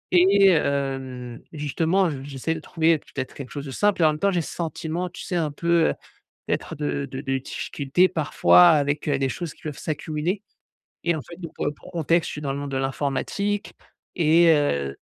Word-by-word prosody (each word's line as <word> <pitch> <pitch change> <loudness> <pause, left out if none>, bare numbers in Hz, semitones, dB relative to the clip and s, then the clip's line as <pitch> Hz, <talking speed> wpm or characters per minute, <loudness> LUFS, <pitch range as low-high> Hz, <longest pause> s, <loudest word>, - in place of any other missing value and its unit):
et 195 +2 +6
hem, 135 -6 -1
justement 160 +5 +1
je 135 -3 -6
j'essaie 140 +3 -3
de 160 - -5
trouver 160 0 +1
peut-être 130 -1 -6
quelque 135 -3 -8
chose 145 -1 -6
de 135 - -6
simple 205 +3 +2
et - - +6
en - - +6
même 150 0 -2
temps 200 - +3
j'ai 180 -3 +1
ce - - -7
sentiment, 170 +1 -3
tu 175 - -9
sais 180 - -4
un 165 -3 +1
peu, 170 +2 +2
heu, - - 0 0.6
d'être - - -2
de 145 -1 -2
de 135 -1 -6
de 135 -1 -1
difficultés 140 +5 0
parfois 170 +2 +5
avec, 145 -2 +1
heu, 145 -3 +1
des 135 -1 +1
choses 170 +2 -4
qui - - -22
peuvent 150 -3 -5
s'accumuler 155 +5 -3 0.6
et 170 -1 +1
en - - -4
fait, 170 - -11
donc 165 -3 -7
pour - - -2
le 145 - 0
pour - - -15
contexte, 165 0 +1
je - - -5
suis 150 - -6
dans 140 -2 -1
le 140 - -4
monde 145 -1 -5
de 135 - -2
l'informatique 145 +10 -2 0.4
et 165 0 +5
heu, 70 - +1
155 Hz, 215 wpm, -24 LUFS, 140-170 Hz, 0.6 s, et